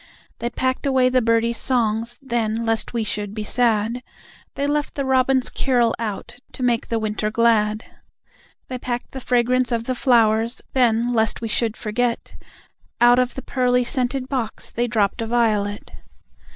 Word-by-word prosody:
They 235 - -2
packed 260 +2 -1
away 260 -2 +3
the 255 0 +2
birdies' 230 0 +1
songs, 230 -1 +1
then, 230 -3 -1
lest 225 -1 0
we 235 -2 -1
should 210 -1 -4
be 215 - -3
sad, 230 +1 0 0.5
They 280 - -1
left 295 0 -1
the 280 - -2
Robin's 260 0 +2
carol 245 -4 +1
out, 225 +1 -5 0.2
to 255 - -6
make 240 -2 +1
the 230 - -1
winter 215 -1 -2
glad; 215 -1 +2 0.8
They 255 -1 -5
packed 245 -1 -4
the 265 - -7
fragrance 250 +1 +1
of 230 -1 0
the 255 - -2
flowers, 230 -2 +2
then, 240 -1 +2
lest 220 -2 +1
we 230 - -4
should 225 0 -1
forget, 235 +2 -2 0.6
Out 240 +1 +6
of 250 0 0
the 265 - -6
pearly 250 -1 +1
scented 255 +1 0
box 250 -5 -4
they 240 +1 -1
dropped 220 -1 0
a 225 - -3
Violet. 215 -3 0
235 Hz, 165 wpm, -21 LUFS, 225-255 Hz, 0.8 s, Out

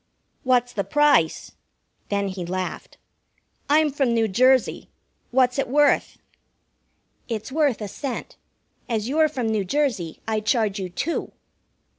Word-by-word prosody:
"What's 250 -3 +1
the 200 - -1
price?" 295 - +2 0.6
Then 200 -1 0
he 185 -1 -5
laughed. 185 +1 -5 0.7
"I'm 305 0 +4
from 270 -4 +1
New 225 -1 +2
Jersey. 255 +5 +2 0.4
What's 250 +1 +2
it - - 0
worth?" 290 +2 +2 1.1
"It's 225 +1 -4
worth 285 -6 +1
a 210 - -3
cent. 265 +5 -6 0.5
As 225 -2 -1
you're 310 +3 +3
from 260 -5 -3
New 215 -2 0
Jersey, 210 - -1
I 220 -1 0
charge 215 -2 0
you 185 -1 -4
two. 295 - -3
240 Hz, 130 wpm, -23 LUFS, 205-280 Hz, 1.1 s, I'm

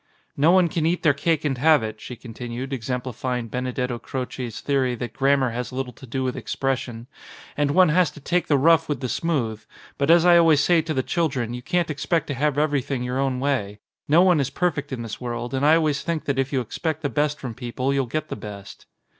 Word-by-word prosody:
"No 150 +4 +3
one 180 0 +5
can 160 -1 -1
eat 175 +2 0
their 155 -4 +5
cake 155 +2 0
and 135 -4 -1
have 155 -2 +5
it," 110 0 -6
she 125 - -7
continued, 120 +3 -7
exemplifying 125 -1 -3
Benedetto 125 0 -2
Croce's 125 -3 -5
the 140 - -1
ory 130 -2 +1
that 120 -1 -6
grammar 135 0 +2
has 125 +2 -4
little 130 -1 -4
to 130 - -13
do 130 +3 -2
with 130 -1 -2
expression, 125 -3 -3 0.5
"and 145 -1 +1
one 180 +3 +5
has 175 +2 +3
to - - -13
take 175 +5 0
the 145 - +3
rough 165 +3 +4
with 145 -4 -1
the 130 - -3
smooth, 120 -6 -1 0.4
but 140 +2 +1
as 170 0 +6
I 175 -1 +7
always 160 -3 +5
say 170 +2 +4
to 155 -1 -4
the 130 - +1
children 130 -9 -1
you 125 - -5
can't 175 +3 0
ex 145 - -5
pect 170 -3 +2
to - - -1
have 145 +2 0
everything 140 -4 0
your 125 +1 -2
own 135 -2 0
way. 125 -7 -1 0.3
No 165 +5 +5
one 180 -4 +4
is 140 -1 0
perfect 170 -3 -1
in 125 -3 -4
this 115 +1 -7
world 120 0 -4
and 135 +1 -1
I 155 +2 +6
always 155 -3 +1
think 165 -2 -3
that 140 -2 -1
if 135 0 0
you 135 -3 +1
expect 160 +6 -4
the - - +2
best 150 +3 0
from 125 -3 -5
people 130 +2 -2
you'll 135 -2 0
get 155 +5 -3
the - - -3
best." 100 -2 -10
135 Hz, 235 wpm, -23 LUFS, 125-155 Hz, 0.5 s, I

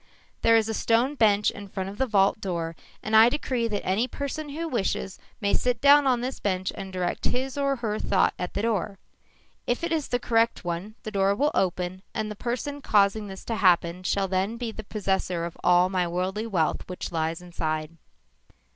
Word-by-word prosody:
_ - - -43
"_There 230 - +7
is 220 -1 +1
a 225 - -2
stone 235 +5 +2
bench 210 -6 +3
in 200 0 -9
front 190 -1 -4
of 200 +2 -8
the 265 - +2
vault 200 -1 +3
door 170 -3 -3 0.3
and 215 +1 0
I 220 +2 +8
decree 250 -4 -1
that 210 -3 -3
any 205 +7 +1
person 285 +3 -5
who 325 +4 -4
wishes, 195 - -2 0.2
may 200 -2 0
sit 250 -2 +1
down 285 +1 +6
on 250 -2 +2
this 255 +2 -4
bench 185 -2 -1
and 190 -1 -7
direct 180 -1 -2
his 260 +1 -1
or 275 -1 +1
her 220 -4 -3
thought 190 - +2
at 180 0 -4
the 200 - -1
door. 210 -3 -1 0.7
If 245 +6 0
it 340 - -1
is 315 -3 0
the 245 - 0
correct 230 -4 +1
one, 175 +5 -4
the 215 - -5
door 195 -1 +2
will 290 +6 +2
open 180 0 -1
and 215 -1 -2
the - - -6
person 250 +6 -4
causing 205 -2 +2
this 190 -1 -9
to 230 - -2
happen 175 -2 +3
shall 195 +1 0
then 190 +4 -1
be 235 -1 -3
the 220 - -8
possessor 190 -4 -1
of 170 - -7
all 180 0 +5
my 185 -2 0
worldly 185 +5 -2
wealth 170 -8 0
which 180 - -5
lies 165 0 -1
inside. 160 -2 -4
205 Hz, 210 wpm, -26 LUFS, 185-235 Hz, 0.7 s, I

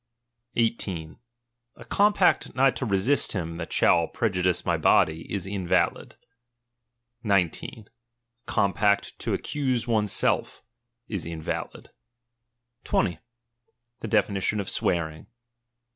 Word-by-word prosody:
18. 95 -9 -2 0.6
A - - -13
compact 205 -2 +2
not 135 +1 +4
to 130 - -3
resist 100 +8 +1
him 85 -4 -4
that 85 - -6
shall 85 -1 +3
prejudice 90 -5 0
my - - +2
body, 80 +1 +2
is 100 -3 -3
invalid. 95 -3 -1 1.1
19. 100 +1 -1
A 120 0 -44
compact 100 +1 +1
to - - -1
accuse 130 -5 -2
one's 105 -4 +1
self, - - 0 0.4
is 95 -7 -4
invalid. 80 -2 -5 0.9
20. 85 -3 0 0.8
The - - -5
definition 105 -1 +1
of 100 - -3
swearing. 80 -3 -1
100 Hz, 105 wpm, -26 LUFS, 85-115 Hz, 1.1 s, not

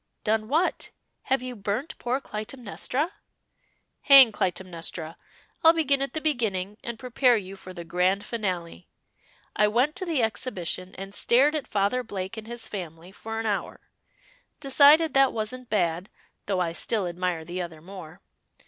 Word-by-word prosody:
"Done 215 0 0
what? 320 +8 0 0.4
Have 265 -1 +1
you 255 -1 -5
burnt 215 +8 -3
poor 250 +2 -1
Clytemnestra?" 250 - -3 0.9
"Hang 270 -4 +9
Clytemnestra! 175 -4 -3 0.5
I'll 325 0 +8
begin 285 -4 +2
at 275 - -2
the 315 - -3
beginning 210 -9 -1
and 235 -1 -5
prepare 250 0 +3
you 195 -1 -7
for 190 -1 -10
the 175 -2 -8
grand 180 +4 0
finale. 185 -7 -4 0.7
I 210 - +4
went 250 +8 +1
to 380 - -1
the 305 -8 +1
Exhibition, 185 -5 -3
and 195 +1 -8
stared 265 +8 +4
at 305 -4 -3
Father 205 +5 +1
Blake 195 -5 -5
and 220 -1 -8
his 235 -1 -5
family 175 -2 -7
for 225 +3 -6
an 225 - -3
hour. 205 -2 -2 0.8
Decided 290 +2 +6
that 270 -1 +4
wasn't 240 +3 -4
bad, 180 -2 0 0.4
though 190 -3 0
I 170 -2 0
still 205 +3 0
admire 175 -2 -2
the 175 +2 -4
other 170 -3 -7
more. 175 0 -11
215 Hz, 155 wpm, -26 LUFS, 185-255 Hz, 0.9 s, Hang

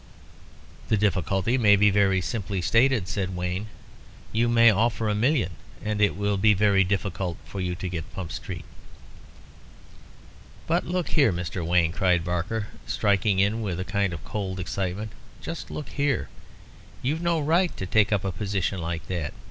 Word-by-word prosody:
"The 110 - +3
difficulty 100 - +1
may 105 -3 +6
be 105 +1 +4
very 95 -2 +3
simply 100 +1 -3
stated," 115 -1 +3
said 95 -2 -2
Wayne. 90 +4 -3 0.6
"You 115 +2 +2
may 115 -1 +6
offer 110 +2 +1
a 105 - +1
million 115 - +1 0.3
and 105 0 -1
it 105 - +3
will 100 0 0
be 105 +1 +4
very 100 -1 +4
difficult 95 -2 -2
for 100 - -6
you 90 -1 -2
to 95 - -5
get 85 -3 -5
Pump 90 -4 -6
Street." - - -6 2.0
"But 170 +2 0
look 180 -1 -1
here, 140 -8 +4
Mr. 90 0 -4
Wayne," 85 0 +2
cried 90 -1 +2
Barker, 90 +5 -2 0.2
striking 100 -1 +2
in 100 +4 +2
with 95 -5 -3
a 95 - -3
kind 100 -1 0
of 85 - -7
cold 95 -3 -4
excitement. 95 +3 -3 0.3
"Just 165 - -6
look 150 - -6
here. 145 -1 0 0.7
You've 150 +6 0
no 170 -1 +1
right 165 +4 +1
to 95 - -3
take 105 +2 +3
up 100 -2 +1
a 95 - 0
position 95 0 -2
like 80 -1 -4
that. 85 -5 -4
100 Hz, 165 wpm, -26 LUFS, 90-110 Hz, 2.0 s, may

